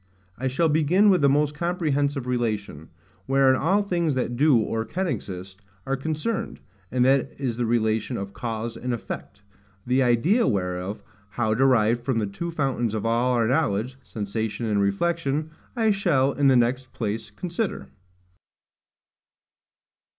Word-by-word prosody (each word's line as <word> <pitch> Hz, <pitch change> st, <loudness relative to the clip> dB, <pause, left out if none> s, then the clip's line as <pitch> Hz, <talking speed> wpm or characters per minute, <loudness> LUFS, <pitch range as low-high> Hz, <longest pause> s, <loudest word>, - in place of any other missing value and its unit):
I 130 Hz, +5 st, -3 dB
shall 150 Hz, +6 st, +1 dB
begin 160 Hz, +7 st, +4 dB
with 185 Hz, -, +3 dB
the 140 Hz, -, +5 dB
most 145 Hz, +1 st, +2 dB
comprehensive 150 Hz, -5 st, -1 dB
relation, 110 Hz, -10 st, -2 dB, 0.4 s
wherein 135 Hz, 0 st, +4 dB
all 190 Hz, +9 st, +2 dB
things 170 Hz, -7 st, 0 dB
that 125 Hz, -1 st, -1 dB
do, 145 Hz, 0 st, +4 dB
or 110 Hz, 0 st, -1 dB
can 180 Hz, -, -3 dB
exist, 95 Hz, -, -5 dB, 0.2 s
are 135 Hz, -, 0 dB
concerned, 155 Hz, +10 st, -3 dB, 0.3 s
and 125 Hz, -1 st, +2 dB
that 135 Hz, 0 st, +2 dB
is 130 Hz, -5 st, -1 dB
the 120 Hz, -1 st, 0 dB
relation 110 Hz, +1 st, 0 dB
of 100 Hz, 0 st, -6 dB
CAUSE 115 Hz, +1 st, -4 dB
and 125 Hz, +1 st, -2 dB
EFFECT: 100 Hz, -2 st, -8 dB, 0.4 s
the 125 Hz, +2 st, +2 dB
idea 130 Hz, -, +3 dB
whereof, 95 Hz, -1 st, -2 dB, 0.3 s
how 110 Hz, +1 st, 0 dB
derived 120 Hz, -2 st, +3 dB
from 125 Hz, -1 st, 0 dB
the 110 Hz, -, +1 dB
two 105 Hz, +13 st, -5 dB
fountains 135 Hz, -8 st, -1 dB
of 110 Hz, -, -3 dB
all 120 Hz, +2 st, +2 dB
our 120 Hz, -2 st, +2 dB
knowledge, 125 Hz, -2 st, 0 dB
sensation 110 Hz, +2 st, -4 dB
and 105 Hz, -2 st, +1 dB
reflection, 150 Hz, +8 st, 0 dB, 0.2 s
I 225 Hz, -3 st, +3 dB
shall 165 Hz, -10 st, +2 dB
in 140 Hz, -1 st, +2 dB
the 130 Hz, -2 st, +5 dB
next 130 Hz, +2 st, 0 dB
place 110 Hz, -1 st, -3 dB
consider. 185 Hz, +4 st, -4 dB
125 Hz, 150 wpm, -25 LUFS, 110-150 Hz, 0.4 s, the